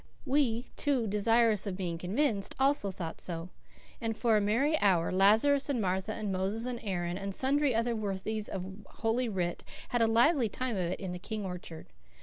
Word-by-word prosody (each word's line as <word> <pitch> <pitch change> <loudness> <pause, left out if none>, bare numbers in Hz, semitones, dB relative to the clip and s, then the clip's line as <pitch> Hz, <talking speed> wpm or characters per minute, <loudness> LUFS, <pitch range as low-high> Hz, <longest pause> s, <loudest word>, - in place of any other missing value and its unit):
We, 255 -4 +2
too 275 -5 +1
desirous 215 +1 +2
of 185 -2 -3
being 170 -3 -3
convinced, 200 - 0
also 270 -6 +3
thought 175 -3 -6
so; 170 0 -4 0.5
and 225 -1 -2
for 230 -3 +3
a 210 - +3
merry 240 +10 +2
hour 180 -5 +3
Lazarus 220 +10 +4
and 270 -4 0
Martha 190 +1 -1
and 215 -2 -3
Moses 195 +5 -1
and 250 -1 -3
Aaron 175 -3 -2
and 195 -1 -4
sundry 275 -1 +2
other 230 +1 +1
worthies 210 +1 -3
of 185 -2 -4 0.2
Holy 230 +2 -1
Writ 180 -4 -2 0.3
had 240 - +1
a 225 - +5
lively 235 +2 +4
time 255 +2 -3
of 190 - -1
it - - -4
in 190 -2 -4
the 180 - -5
King 210 +2 -5
orchard. 175 -3 -7
215 Hz, 185 wpm, -31 LUFS, 190-240 Hz, 0.5 s, a